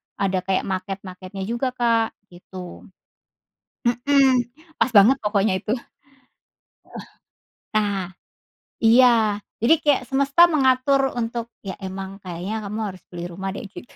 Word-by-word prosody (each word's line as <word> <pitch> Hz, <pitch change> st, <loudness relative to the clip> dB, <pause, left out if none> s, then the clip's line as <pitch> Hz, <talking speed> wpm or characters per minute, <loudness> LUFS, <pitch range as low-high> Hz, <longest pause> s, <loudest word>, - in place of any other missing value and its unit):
ada 190 Hz, -2 st, 0 dB
kayak 190 Hz, -1 st, 0 dB
maket-maketnya 190 Hz, 0 st, -5 dB
juga, 240 Hz, +4 st, -2 dB
Kak, 230 Hz, -2 st, +1 dB, 0.2 s
gitu. 180 Hz, 0 st, -11 dB, 1.0 s
Mhm, 255 Hz, 0 st, +3 dB, 0.3 s
pas 255 Hz, -, +2 dB
banget 225 Hz, +7 st, +7 dB
pokoknya 205 Hz, -1 st, +1 dB
itu. 215 Hz, -, -4 dB, 1.8 s
Eh, 215 Hz, -, -9 dB
nah, 200 Hz, -4 st, -1 dB, 0.8 s
iya. 225 Hz, -3 st, +5 dB, 0.2 s
Jadi 320 Hz, +8 st, +6 dB
kayak 290 Hz, -3 st, +3 dB
semesta 280 Hz, +6 st, +5 dB
mengatur 270 Hz, -1 st, +2 dB
untuk 235 Hz, 0 st, -3 dB, 0.2 s
ya 190 Hz, -2 st, -5 dB
emang 190 Hz, 0 st, -7 dB
kayaknya 185 Hz, +5 st, -5 dB
kamu 210 Hz, +2 st, -5 dB
harus 185 Hz, -2 st, -15 dB
beli 175 Hz, -1 st, -7 dB
rumah 195 Hz, +2 st, -5 dB
deh -, -, -6 dB
gitu. 230 Hz, -, -13 dB
215 Hz, 120 wpm, -22 LUFS, 190-250 Hz, 1.8 s, banget